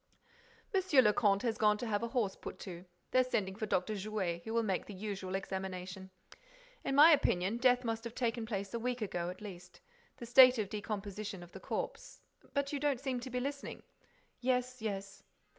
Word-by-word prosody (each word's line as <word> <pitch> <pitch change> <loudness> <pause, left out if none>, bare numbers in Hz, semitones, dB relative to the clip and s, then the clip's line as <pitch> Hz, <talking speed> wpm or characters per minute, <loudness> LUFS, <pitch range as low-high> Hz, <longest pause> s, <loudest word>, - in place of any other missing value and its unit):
"Monsieur 370 -9 +5
le 210 -2 +5
Comte 200 -2 +3
has 225 -2 -1
gone 210 -1 +4
to 240 - -4
have 210 -2 0
a 235 - -1
horse 230 -6 0
put - - -8
to. 180 -2 -8 0.3
They're 255 - +5
sending 205 -6 -1
for 215 +2 -4
Dr. 190 +2 0
Jouet, 195 -4 -2
who 220 - -6
will 230 0 +2
make 195 -4 -1
the 205 - -8
usual 190 -1 -4
examination. 190 0 -5 0.7
In 270 - -1
my 305 +4 +9
opinion, 200 - +2
death 250 0 +4
must 225 -1 -2
have 235 - -6
taken 230 -2 -1
place 200 -2 -3
a 235 - -1
week 245 0 -2
ago, 175 -4 -2
at 180 - -8
least. 180 -3 -10 0.4
The 235 - -7
state 255 +1 +8
of 210 -3 -1
decomposition 205 -2 -4
of 175 - -14
the 190 - -9
corpse—but 280 - -5
you 285 - -1
don't 285 -3 +1
seem 260 -2 -2
to 250 +2 -7
be 250 0 -2
listening—" 280 +2 -5 0.6
"Yes, 250 0 0
yes." 195 -2 -4
215 Hz, 195 wpm, -34 LUFS, 195-250 Hz, 0.7 s, my